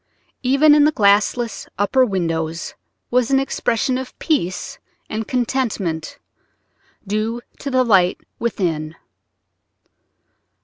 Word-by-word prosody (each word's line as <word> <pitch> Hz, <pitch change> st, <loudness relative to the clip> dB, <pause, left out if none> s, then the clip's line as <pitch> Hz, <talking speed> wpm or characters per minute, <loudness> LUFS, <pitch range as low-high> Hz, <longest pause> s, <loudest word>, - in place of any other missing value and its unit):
Even 275 Hz, +4 st, +5 dB
in 295 Hz, 0 st, +6 dB
the 305 Hz, -, +4 dB
glassless 215 Hz, +1 st, +2 dB
upper 205 Hz, +6 st, +3 dB
windows 165 Hz, -6 st, -2 dB, 0.4 s
was 250 Hz, -1 st, +2 dB
an 270 Hz, 0 st, +4 dB
expression 255 Hz, -1 st, 0 dB
of 260 Hz, -1 st, -8 dB
peace 185 Hz, -, -2 dB, 0.3 s
and 215 Hz, 0 st, -3 dB
contentment, 225 Hz, -10 st, -2 dB, 0.9 s
due 215 Hz, +3 st, -1 dB, 0.2 s
to 280 Hz, -, -4 dB
the 255 Hz, -1 st, +3 dB
light 190 Hz, -6 st, +3 dB, 0.2 s
within. 165 Hz, -9 st, -2 dB
225 Hz, 100 wpm, -20 LUFS, 185-260 Hz, 0.9 s, in